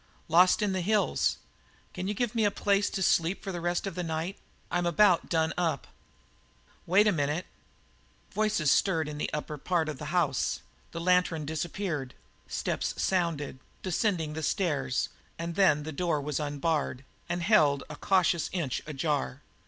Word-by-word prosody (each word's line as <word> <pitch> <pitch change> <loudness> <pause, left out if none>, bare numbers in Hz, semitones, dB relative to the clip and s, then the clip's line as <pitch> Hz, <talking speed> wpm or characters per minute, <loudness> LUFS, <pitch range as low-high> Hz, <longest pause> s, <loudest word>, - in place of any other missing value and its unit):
"Lost 180 +5 +5
in 205 - +1
the 190 -1 -1
hills. 210 +3 +1 0.6
Can 185 +1 -4
you 205 - -1
give 240 +1 -1
me 225 -2 +1
a 205 - +4
place 200 0 +1
to 190 - -2
sleep 170 +2 +2
for 195 - -3
the 175 -2 -4
rest 175 +2 0
of 195 - -3
the 180 - -3
night? 165 +3 -3 0.4
I'm 175 0 +1
about 175 0 +4
done 160 -1 +1
up." 170 -2 0 1.0
"Wait 195 +5 +5
a 210 - +5
minute." 150 +1 -1 0.9
Voices 210 -8 +2
stirred 165 -6 +2
in 150 -1 -6
the - - -2
upper 150 0 -4
part 170 0 0
of 150 -4 -5
the 150 - -6
house; 155 -4 0 0.3
the 170 - -5
lantern 180 -3 +2
disappeared; 160 -3 -3 0.3
steps - - -2
sounded, 165 -8 0 0.2
descending 180 -4 0
the 160 - -4
stairs, 140 -7 0 0.3
and 170 0 -4
then 165 -6 +4
the 160 - -5
door 165 0 0
was 145 0 -2
unbarred 145 -2 -1 0.2
and 175 0 -1
held 155 -9 +4
a 150 - -8
cautious 180 -1 +2
inch 165 -9 -2
ajar. 145 -2 -2
170 Hz, 165 wpm, -29 LUFS, 150-185 Hz, 1.0 s, Lost